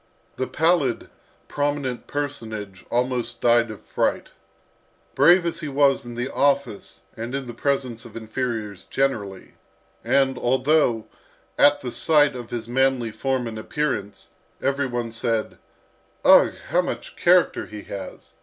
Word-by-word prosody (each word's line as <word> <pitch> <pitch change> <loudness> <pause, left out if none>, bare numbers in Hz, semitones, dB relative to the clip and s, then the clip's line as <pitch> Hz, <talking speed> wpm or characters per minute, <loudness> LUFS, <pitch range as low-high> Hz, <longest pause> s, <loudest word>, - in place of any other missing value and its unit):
The 130 - -1
pallid 160 -7 +1 0.4
prominent 145 -4 -2
personage 110 -10 -5
almost 120 -1 -1
died 120 -1 +3
of 110 - -10
fright. - - -1 0.8
Brave 170 +6 +5
as 170 - -2
he 155 - -5
was 140 -1 +2
in 120 - -7
the 120 +2 -2
office 140 -6 0
and 115 +4 -5
in 140 -1 -3
the 120 - -7
presence 125 -2 -1
of 115 -2 -10
inferiors 110 -3 -4
generally, 105 -9 -2 0.5
and 135 +2 +2
although, 130 -2 +2 0.5
at 145 0 +5
the 125 - -4
sight 150 -2 +3
of 120 -2 -7
his 115 -2 -5
manly 130 -2 +1
form 130 +2 -1
and 110 -1 -5
appearance, 110 -6 -3 0.3
every 140 0 0
one 120 -2 -3
said, 115 -1 -2 0.7
"Ugh! - - +7
how - - +3
much - - -6
character - - +3
he 105 -1 -9
has!" 100 - -9
125 Hz, 135 wpm, -23 LUFS, 115-140 Hz, 0.8 s, Ugh